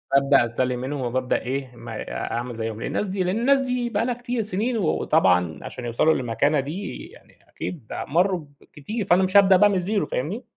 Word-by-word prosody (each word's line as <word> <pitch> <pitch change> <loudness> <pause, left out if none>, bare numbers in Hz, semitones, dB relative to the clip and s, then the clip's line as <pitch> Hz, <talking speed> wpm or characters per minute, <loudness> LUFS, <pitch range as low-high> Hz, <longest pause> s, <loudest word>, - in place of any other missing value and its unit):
بابدأ 140 -2 +5
أستلهم 125 +1 -1
منّهم 135 +2 -4
وبابدأ 125 +1 -1
إيه، 130 0 -4
ما 115 -1 -9
أ - - -5
أعمل 120 0 -3
زيهم، 110 0 -4
لأن - - -3
الناس 210 - -1
دي 190 0 -1
لأن 185 +4 0
الناس 275 +3 +4
دي 250 -2 -1
بقى 225 +1 0
لها 250 - 0
كتير، 245 0 -3
سنين، 220 +4 -1
وطبعًا 90 - +2
عشان 125 - -7
يوصلوا 120 +7 +2
للمكانة 135 +5 +1
دي 160 +9 -5
يعني - - -19
أكيد 140 -12 -7 0.2
مرّوا 175 +1 +1 0.2
بكتير، 205 +8 -6
فأنا 185 0 +4
مش 190 +2 +3
هابدأ 195 -2 +7
بقى 205 +2 +6
من 200 - 0
الزيرو، 195 +3 0
فاهمني؟ - - -3
160 Hz, 200 wpm, -24 LUFS, 125-205 Hz, 0.2 s, هابدأ